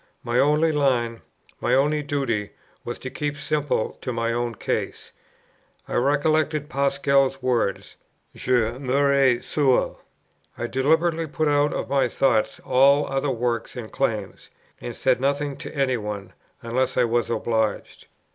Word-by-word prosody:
My 120 +1 0
only 150 +3 +3
line, 125 -6 0 0.4
my - - +2
only 150 +3 +2
duty, 135 -8 -2 0.3
was 120 - -5
to 130 - -7
keep 145 -1 -3
simply 150 -5 -1
to 125 - -3
my 115 -1 -1
own 120 -1 -2
case. - - -3 0.8
I - - -6
recollected 150 +2 +1
Pascal's 140 -1 +1
words, 125 -2 -1 0.4
"Je - - -8 0.3
mourrai 135 -2 +2
seul." 140 -4 +1 0.6
I - - -3
deliberately 160 +6 +1
put 155 +1 -1
out 145 0 +3
of - - -3
my 140 -1 +2
thoughts 110 -5 +1
all 140 +3 +4
other 135 +1 -1
works 120 -2 -2
and 120 -3 -7
claims, 105 -7 -3 0.3
and 120 - -6
said 130 -1 +1
nothing 140 +1 0
to - - -9
any 135 -3 +1
one, 105 -3 -6 0.3
unless 125 +3 -1
I 125 - +5
was 120 0 0
obliged. 110 -1 -2
135 Hz, 140 wpm, -24 LUFS, 120-145 Hz, 0.8 s, I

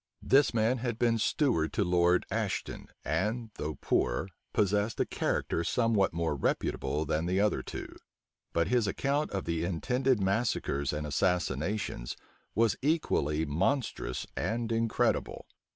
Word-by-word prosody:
This 140 +2 +5
man 115 +2 +2
had 120 -2 -2
been 115 -1 +2
steward 115 - +1
to - - +2
Lord 90 0 +3
Aston, - - -2 0.2
and, 110 +3 -1
though 75 0 -3
poor, 95 - 0 0.2
possessed 105 +2 +1
a - - +3
character 85 - -1
somewhat 110 +1 +2
more 80 -2 -1
reputable 70 +2 -1
than 80 +2 0
the 90 +2 +1
other 105 +1 +2
two: - - -7 0.6
but 85 -1 +1
his 120 -4 +2
account 140 +8 0
of 95 -1 -3
the 85 -1 -1
intended 125 +8 +1
massacres 95 - 0
and 75 0 -3
assassinations 85 - -1 0.4
was 110 -1 +3
equally 80 - +1
monstrous 90 - -1
and 115 0 -1
incredible. 115 0 0
100 Hz, 135 wpm, -30 LUFS, 80-115 Hz, 0.6 s, This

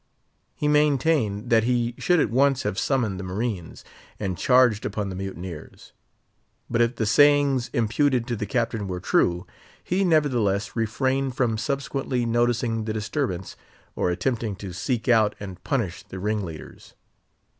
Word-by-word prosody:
He 150 - -1
maintained 145 -7 +2
that 115 -1 +5
he 120 -1 +1
should 180 -1 +3
at - - +1
once 135 +1 +3
have 105 -2 -2
summoned 115 -9 0
the - - -5
marines, 95 -1 -4 0.3
and 95 -3 -2
charged 125 +2 +3
upon 100 -1 -3
the 95 - -6
"mutineers." 95 -4 -8 0.8
But 115 0 +2
if 120 +1 +2
the 115 - -1
sayings 140 +1 +4
imputed 120 +2 +1
to 120 -1 -2
the 105 -1 -4
Captain 115 -4 -1
were 90 -1 -4
true, 90 +1 +1 0.4
he 185 +3 0
nevertheless 120 - +1
refrained 130 +4 0
from 120 -4 +1
subsequently 135 0 -2
noticing 120 -1 0
the 110 - -2
disturbance, 105 - -3 0.4
or - - 0
attempting 110 +3 -1
to 95 -2 -8
seek 115 +6 -2
out 110 -4 +4
and 95 -3 -9
punish 110 - -2
the 95 - -10
ringleaders. 95 -6 -5
115 Hz, 145 wpm, -24 LUFS, 100-130 Hz, 0.8 s, that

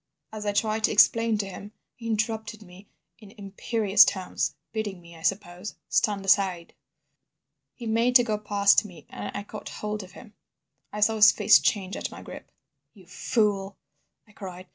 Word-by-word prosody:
As 215 -1 -6
I - - +2
tried 215 +1 -1
to - - 0
explain 225 +1 +4
to 205 - -2
him, 200 +2 -10 0.2
he 230 - -10
interrupted 220 0 -3
me 190 +2 -16 0.3
in 210 0 -16
imperious 205 +1 +3
tones, 185 -2 -2 0.2
bidding 210 -4 -4
me, 170 -1 -15
I 165 - -14
suppose, 190 +1 -3
stand 200 -2 0
aside. 190 -3 +1 1.0
"He 240 - -9
made 230 +3 +1
to 245 - +8
go 215 -3 -2
past 200 -1 +3
me, 175 -8 -13
and - - -6
I 205 - -5
caught 210 0 -9
hold 210 0 -5
of 185 -1 -13
him. 220 -4 -14 0.6
"I 210 - -6
saw 220 +1 +3
his 215 0 +8
face 215 - +5
change 195 -2 -1
at - - -4
my - - -11
grip. - - -11 0.4
"'You 190 -3 -17
fool,' 200 +1 -1 0.5
I - - -21
cried. 185 -3 -9
210 Hz, 175 wpm, -26 LUFS, 195-220 Hz, 1.0 s, to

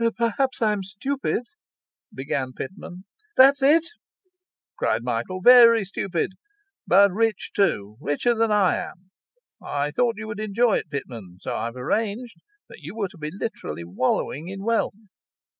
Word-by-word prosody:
'Perhaps 240 +2 0
I'm 210 -2 +1
stupid 245 +8 -3 0.4
' - - - 0.3
began 130 -1 -3
Pitman. 185 +5 -8 0.3
'That's 275 +2 +7
it!' 310 +4 +5 0.9
cried 115 +2 0
Michael. 120 +10 -3
'Very 230 -2 +7
stupid; 190 -2 -2 0.6
but 200 0 +6
rich 220 +1 -1
too 105 - 0
richer 150 - +1
than 225 -1 +1
I 205 -3 +3
am. 185 +1 -9 0.5
I 145 +1 -2
thought 235 +7 +1
you 215 - -6
would 215 -1 -6
enjoy 215 +2 +2
it, - - -6
Pitman, 115 - -7
so - - -4
I've 115 +1 -4
arranged 215 - -2 0.3
that - - -13
you 160 +7 -8
were 205 -4 -2
to 190 - -17
be 150 0 -4
literally 165 - -5
wallowing 130 - -2
in 195 +1 -7
wealth. 220 -2 -2
195 Hz, 145 wpm, -24 LUFS, 145-230 Hz, 0.9 s, That's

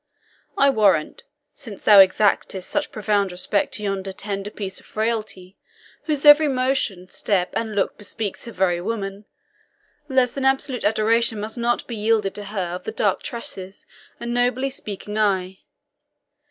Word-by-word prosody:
I 275 0 +5
warrant, 200 -10 +1 0.3
since 220 -7 -10
thou 205 -2 +8
exactest 195 -1 +3
such 295 0 -2
profound 205 -2 0
respect 185 +3 -1
to 210 - -5
yonder 195 -1 -2
tender 200 +1 -5
piece 195 -3 -6
of - - -19
frailty, 215 -4 -3 0.5
whose 300 -2 -1
every 295 +1 +8
motion, 255 -9 -1
step, 185 -4 -1
and 220 -2 -2
look 200 - -1
bespeaks 205 -1 -5
her 235 - -7
very 180 -4 0
woman, 200 0 -4 0.8
less 260 -2 +2
than 275 - -4
absolute 265 -1 +1
adoration 220 +1 +2
must 215 +1 -5
not 240 +1 0
be 235 - -6
yielded 210 -2 +1
to 205 0 -7
her 195 -3 -3
of 180 - -7
the - - -3
dark - - 0
tresses 195 -6 -7 0.3
and 235 0 -4
nobly 250 +2 +1
speaking 210 -3 -5
eye. 190 -3 0
210 Hz, 155 wpm, -22 LUFS, 195-235 Hz, 0.8 s, thou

